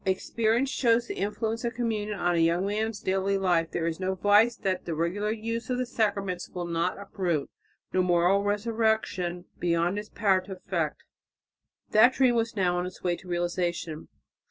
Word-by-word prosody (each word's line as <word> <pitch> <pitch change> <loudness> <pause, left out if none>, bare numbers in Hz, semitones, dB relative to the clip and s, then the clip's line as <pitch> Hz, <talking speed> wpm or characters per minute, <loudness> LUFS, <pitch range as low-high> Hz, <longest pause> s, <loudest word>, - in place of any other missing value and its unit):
Experience 225 +6 +1
shows 235 -1 +2
the - - -5
influence 220 +3 -2
of 235 0 -2
communion 215 -3 -2
on 175 0 +2
a 170 - +2
young 170 +3 +2
man's 215 +1 -1
daily 195 +1 +1
life. 175 -4 +1
There 165 - -2
is 165 0 -2
no 190 0 -1
vice 205 +5 +4
that 190 -1 -2
the 165 - -3
regular 180 +6 -1
use 230 +1 -3
of 250 - 0
the 255 - 0
sacraments 200 -6 -1
will 180 -1 -5
not 170 +1 -1
uproot, 180 -7 -2 0.4
no 185 - +3
moral 180 +2 +3
resurrection 205 -4 0
beyond 175 +3 +1
its 210 - -8
power 195 -3 +2
to 190 +1 -8
effect." 185 - -3 0.9
That 220 +4 +6
dream 260 -3 +3
was 230 -1 0
now 180 -3 +1
on 180 - -2
its 185 - -11
way 175 -1 +1
to 185 - -15
realization. 175 -2 -2
195 Hz, 180 wpm, -27 LUFS, 175-220 Hz, 0.9 s, That